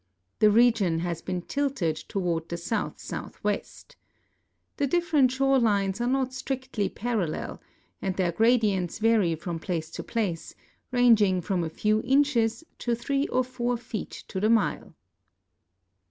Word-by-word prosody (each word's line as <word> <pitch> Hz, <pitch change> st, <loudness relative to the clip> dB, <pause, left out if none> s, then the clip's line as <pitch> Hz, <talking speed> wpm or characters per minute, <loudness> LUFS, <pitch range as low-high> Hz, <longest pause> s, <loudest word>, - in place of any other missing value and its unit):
The 215 Hz, -, +6 dB
region 220 Hz, -6 st, +4 dB
has 170 Hz, -1 st, -3 dB
been 180 Hz, -2 st, -3 dB
tilted 275 Hz, -, -1 dB
toward 170 Hz, -1 st, -3 dB
the 170 Hz, -, -3 dB
south 205 Hz, +5 st, -2 dB
southwest. -, -, -5 dB, 0.8 s
The 285 Hz, -, +1 dB
dif 345 Hz, +4 st, 0 dB
ferent 275 Hz, -5 st, +5 dB
shore 270 Hz, +1 st, +2 dB
lines 200 Hz, -2 st, +1 dB
are 240 Hz, -, +1 dB
not 260 Hz, 0 st, +1 dB
strictl}^ 260 Hz, -5 st, -3 dB
parallel, 210 Hz, -9 st, -2 dB, 0.4 s
and 190 Hz, -2 st, -2 dB
their 180 Hz, -3 st, +1 dB
gradients 215 Hz, -4 st, +2 dB
vary 215 Hz, -6 st, +3 dB
from 170 Hz, +1 st, -5 dB
place 160 Hz, -1 st, -3 dB
to -, -, -6 dB
place, 195 Hz, -8 st, -3 dB, 0.4 s
ranging 225 Hz, -7 st, +4 dB
from 180 Hz, 0 st, -1 dB
a 160 Hz, -, -2 dB
few 215 Hz, +6 st, +1 dB
inches 250 Hz, -3 st, +2 dB, 0.2 s
to 240 Hz, -1 st, 0 dB
three 275 Hz, +5 st, -1 dB
or 255 Hz, -, +1 dB
four 245 Hz, -1 st, -2 dB
feet 230 Hz, -2 st, -6 dB
to 190 Hz, -, -3 dB
the 215 Hz, +3 st, +2 dB
mile. 225 Hz, -2 st, +1 dB
220 Hz, 145 wpm, -27 LUFS, 180-250 Hz, 0.8 s, The